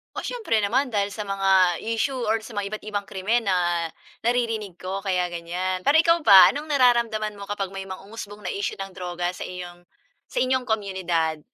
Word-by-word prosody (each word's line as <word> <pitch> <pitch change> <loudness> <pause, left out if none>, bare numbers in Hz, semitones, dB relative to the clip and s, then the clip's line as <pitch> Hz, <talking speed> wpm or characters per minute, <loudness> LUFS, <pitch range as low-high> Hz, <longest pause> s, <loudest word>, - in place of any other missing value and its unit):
Oh, - - -4
siyempre 435 - -1
naman 255 +7 +2
dahil 205 -4 -1
sa 210 0 -6
mga 190 -3 +3
issue 230 +5 -1
or 225 -3 0
sa 220 +1 -11
mga 205 -1 -2
iba't 215 - -5
ibang 205 -1 -3
krimen 215 +5 0
na 175 -4 +1 0.3
naririnig 225 -6 -1
ko 195 +1 -4
kaya 180 -3 0
ganiyan. 175 +2 -3
Pero 285 - +3
ikaw 335 +1 +5
ba, 195 -7 +9
anong 300 +2 -6
nararamdaman 235 -5 +2
mo 200 - -9
kapag 200 -2 -2
may 195 - -4
mga 190 -1 -8
umusbong 210 -1 -9
na - - -1
issue 200 - -3
ng 195 -1 -6
droga 175 -1 -3
sa - - -6
iyong 175 -1 -8 0.5
sa - - -9
inyong 260 0 +1
komunidad? 185 -7 -1
200 Hz, 195 wpm, -24 LUFS, 185-225 Hz, 0.5 s, ba